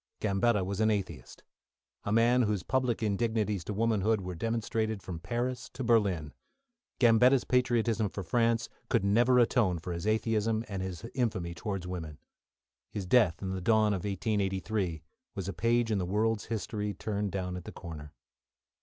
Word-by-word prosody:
Gambetta 105 0 +2
was 100 +1 -3
an 110 0 +3
atheist, 100 -3 -4 0.6
a 100 - -1
man 120 +3 +4
whose 105 -5 0
public 125 -2 0
indignities 105 -2 0
to - - -4
womanhood 110 0 +1
were 90 0 -5
demonstrated 110 +1 -2
from 85 -3 -6
Paris 120 +8 -3
to 130 - -4
Berlin. 100 -10 +2 0.7
Gambetta's 125 +2 +5
patriotism 120 -4 +1
for 95 - -6
France 115 +5 +1 0.2
could 95 - +2
never 120 +5 +4
atone 115 -6 +3
for 85 +2 -5
his 85 +4 -4
atheism, 110 0 +1
and 100 -3 -4
his 95 +2 -5
infamy 100 -9 -1
towards 95 0 -4
women. 80 -5 -6 0.7
His 100 -3 -5
death, 95 -4 +3
in 95 - -2
the 95 0 -3
dawn 110 +1 +3
of 95 - -1
1883, 95 -3 -1 0.3
was 95 -2 -4
a 100 - -3
page 115 +4 +1
in 105 - +1
the 90 - -1
world's 110 +2 0
history 105 -2 -3
turned 105 -1 -2
down 90 -1 -3
at 90 - -7
the - - -7
corner. 75 -4 -9
105 Hz, 165 wpm, -30 LUFS, 95-115 Hz, 0.7 s, Gambetta's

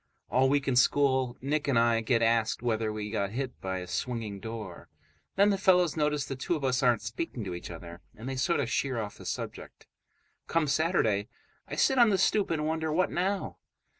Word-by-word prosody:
All 130 +2 +4
week 140 0 +1
in 130 - +2
school 130 -1 +3
Nick 145 +3 -1
and 135 -4 +2
I 115 -1 +3
get 115 +1 +1
asked 115 0 +1
whether 110 -2 0
we 105 -1 -5
got 100 -3 -1
hit 130 +4 -5
by 95 0 -3
a 90 -1 -6
swinging 110 0 -3
door; 110 -4 -7 0.5
then 200 +1 +5
the 195 - 0
fellows 180 -4 +4
notice 150 -2 0
the 135 - -5
two 135 +6 -1
of 150 - -5
us 130 0 +1
aren't 120 -5 +3
speaking 115 +1 -4
to 95 -3 -5
each 85 - -7
other, 85 0 -9
and 115 +4 -9
they 135 - -3
sort 130 +6 +1
of 130 - -1
sheer 130 0 -1
off 105 -2 -6
the - - -9
subject. - - -6 0.6
Come 165 -1 +1
Saturday, 135 - +1 0.4
I - - -5
sit 265 -2 +3
on 235 -2 +7
the 195 - +2
stoop 205 +2 +2
and 155 -2 -1
wonder, 160 0 -1
what 180 +4 +1
now? 190 +3 -2
130 Hz, 210 wpm, -29 LUFS, 110-155 Hz, 0.6 s, on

